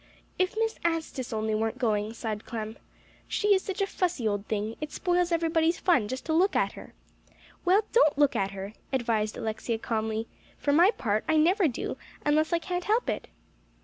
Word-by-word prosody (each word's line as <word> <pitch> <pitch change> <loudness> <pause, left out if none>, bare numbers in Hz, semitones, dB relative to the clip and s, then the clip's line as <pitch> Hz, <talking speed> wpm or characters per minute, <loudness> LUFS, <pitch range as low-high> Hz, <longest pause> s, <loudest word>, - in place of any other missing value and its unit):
"If 370 +2 +1
Miss 450 0 0
Anstice 320 -7 -2
only 220 -1 -1
weren't 220 +1 -1
going!" 215 -3 0
sighed 220 -2 -4
Clem. 220 -1 -5 0.5
"She 415 - 0
is 380 - +3
such 390 +1 -4
a - - +3
fussy 355 - -1
old 205 -1 -2
thing. 215 +1 -2
It 305 - -4
spoils 355 -1 +1
everybody's 330 0 +2
fun 265 - +3
just 260 +4 -5
to 320 - 0
look 365 +5 +3
at - - +2
her." - - -12 0.7
"Well, 385 +4 +5
don't 310 - +5
look 290 -2 +4
at 195 - +1
her," 195 +1 -7 0.2
advised 230 -5 0
Alexia 225 +1 -2
calmly; 220 -1 -2 0.3
"for 285 - +1
my 345 +6 +7
part, 215 - 0
I 315 - +4
never 355 +4 +4
do, 250 - -3 0.3
unless 305 +2 +3
I 340 - +3
can't 355 +1 -3
help 445 +4 +2
it." - - -5
285 Hz, 185 wpm, -28 LUFS, 220-350 Hz, 0.7 s, my